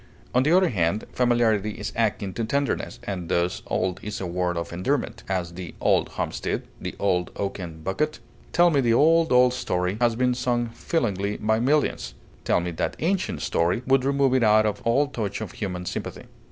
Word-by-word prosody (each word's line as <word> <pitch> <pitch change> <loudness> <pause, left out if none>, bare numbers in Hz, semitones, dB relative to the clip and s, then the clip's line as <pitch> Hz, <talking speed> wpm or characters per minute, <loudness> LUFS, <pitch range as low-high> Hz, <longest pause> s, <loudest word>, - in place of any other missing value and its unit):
On 125 - +4
the 145 +4 +2
other 185 -2 +4
hand, 95 +1 0
familiarity 115 -4 +2
is - - -6
akin 105 -4 0
to 115 - -2
tenderness, 140 +5 -1
and 90 -4 -5
thus 85 +1 0
old 90 -1 -1
is 105 0 -5
a 95 - -3
word 90 0 -1
of 85 +1 -4
endearment; 115 +12 -1
as, 90 -3 -2
"the 90 -1 -8
old - - +2
homestead," - - -3 0.2
the - - -5
"old 90 -3 +1
oaken 90 -5 -5
bucket." 150 - -1 0.3
"Tell 175 0 +5
me 140 -3 +3
the 115 -2 +3
old, 165 +4 +4
old 125 0 +5
story!" 95 -5 -1
has 120 -1 +3
been 125 +1 +2
sung 120 -1 0
feelingly 105 - -1
by 110 +1 +1
millions; 120 - 0 0.3
"tell - - +3
me 90 0 -3
that 80 - -2
ancient 175 - -1
story" 85 - +1
would 135 0 +3
remove 140 -1 +2
it 130 - +3
out 110 -1 +5
of 105 -1 -1
all 120 +5 +3
touch 110 -8 -4
of 110 -5 -5
human 90 -4 -4
sympathy. - - -5
110 Hz, 190 wpm, -25 LUFS, 90-125 Hz, 0.3 s, Tell